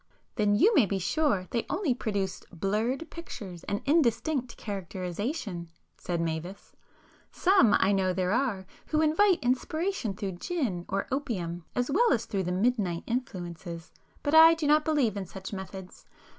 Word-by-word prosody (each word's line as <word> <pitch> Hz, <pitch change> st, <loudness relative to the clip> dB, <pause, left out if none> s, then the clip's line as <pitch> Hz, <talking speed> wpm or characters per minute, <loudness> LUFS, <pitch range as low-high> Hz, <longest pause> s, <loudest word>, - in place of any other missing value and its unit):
"Then 210 Hz, -2 st, +2 dB
you 425 Hz, -, +5 dB
may 260 Hz, -, +5 dB
be 195 Hz, -, -1 dB
sure 200 Hz, -, +1 dB
they 235 Hz, -, 0 dB
only 345 Hz, -7 st, +1 dB
produce 200 Hz, -6 st, -2 dB
blurred 215 Hz, -, -1 dB
pictures 200 Hz, -, -8 dB
and 205 Hz, -, -3 dB
indistinct 270 Hz, -3 st, +1 dB
characterization," 190 Hz, -, -4 dB, 0.3 s
said 175 Hz, -1 st, -3 dB
Mavis—"Some 190 Hz, -, -1 dB
I 190 Hz, -, +3 dB
know 190 Hz, -2 st, +2 dB
there 185 Hz, 0 st, 0 dB
are, 225 Hz, -6 st, 0 dB, 0.2 s
who 310 Hz, 0 st, +1 dB
invite 350 Hz, +5 st, +4 dB
inspiration 260 Hz, -, -1 dB
through 190 Hz, -3 st, -5 dB
gin 235 Hz, -, -2 dB
or 195 Hz, +1 st, -1 dB
opium, 180 Hz, -, -3 dB
as 245 Hz, +3 st, 0 dB
well 475 Hz, +10 st, +4 dB
as 230 Hz, -, +1 dB
through 195 Hz, -3 st, -2 dB
the 180 Hz, -, -1 dB
midnight 190 Hz, -3 st, 0 dB
influences, 175 Hz, -8 st, -5 dB, 0.3 s
but 290 Hz, -, -1 dB
I 325 Hz, +1 st, +9 dB
do 325 Hz, -2 st, -3 dB
not 300 Hz, +1 st, +4 dB
believe 280 Hz, -9 st, +2 dB
in 195 Hz, -2 st, -4 dB
such 190 Hz, +3 st, -8 dB
methods. 190 Hz, -1 st, -8 dB
210 Hz, 150 wpm, -28 LUFS, 185-290 Hz, 0.3 s, I